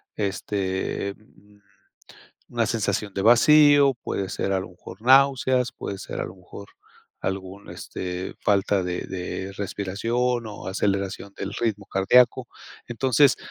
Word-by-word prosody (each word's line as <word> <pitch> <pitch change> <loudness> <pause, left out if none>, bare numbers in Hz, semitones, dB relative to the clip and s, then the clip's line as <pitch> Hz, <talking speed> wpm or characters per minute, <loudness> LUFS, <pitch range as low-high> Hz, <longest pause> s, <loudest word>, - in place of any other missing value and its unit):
este, 100 -1 -2
mm, 105 -1 -24 0.9
una - - +1
sensación 100 -2 -1
de 95 - -1
vacío, 145 +4 +6
puede 95 -1 -3
ser 95 - -2
a 95 - +1
lo 95 - -7
mejor 90 +4 -13
náuseas, 130 -1 +4
puede 100 - -6
ser - - -5
a - - -2
lo 90 - -10
mejor 95 +2 -12 0.5
algún, 95 +1 -5
este, 90 0 -6
falta 100 -1 +2
de 90 0 -3
de 95 +1 -5
respiración 115 +5 -1
o 105 - -9
aceleración 100 0 -2
del 100 +1 -5
ritmo 105 -4 -1
cardiaco. 125 +5 +3 0.4
Entonces, 130 +3 +3
100 Hz, 130 wpm, -24 LUFS, 95-120 Hz, 0.9 s, vacío